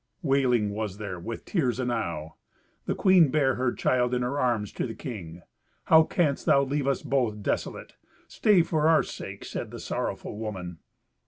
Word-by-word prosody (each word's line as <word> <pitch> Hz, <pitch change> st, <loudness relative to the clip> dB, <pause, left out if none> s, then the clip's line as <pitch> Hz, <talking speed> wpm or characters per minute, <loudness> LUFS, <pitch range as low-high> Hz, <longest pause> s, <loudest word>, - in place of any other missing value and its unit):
Wailing 125 Hz, -7 st, +2 dB
was 105 Hz, -2 st, -4 dB
there, 100 Hz, -4 st, -5 dB
with 115 Hz, +7 st, -6 dB
tears 130 Hz, -, 0 dB
enow. 100 Hz, -11 st, -2 dB, 0.5 s
The -, -, 0 dB
queen 185 Hz, -6 st, +5 dB
bare 135 Hz, -2 st, +2 dB
her 125 Hz, 0 st, 0 dB
child 125 Hz, 0 st, +1 dB
in 125 Hz, -, 0 dB
her 135 Hz, +4 st, -2 dB
arms 120 Hz, -6 st, 0 dB
to -, -, -3 dB
the 115 Hz, -, -7 dB
king. 90 Hz, -, -8 dB, 0.4 s
"How 160 Hz, 0 st, +6 dB
canst 155 Hz, -6 st, 0 dB
thou 140 Hz, -, +5 dB
leave 140 Hz, 0 st, -1 dB
us 140 Hz, -, 0 dB
both 120 Hz, -7 st, 0 dB
desolate? -, -, -3 dB, 0.3 s
Stay 205 Hz, -6 st, +3 dB
for 160 Hz, -2 st, +1 dB
our 160 Hz, -, +5 dB
sake," -, -, -8 dB
said -, -, -5 dB
the -, -, -8 dB
sorrowful 105 Hz, -, -4 dB
woman. 90 Hz, -6 st, -6 dB
125 Hz, 170 wpm, -27 LUFS, 105-140 Hz, 0.5 s, How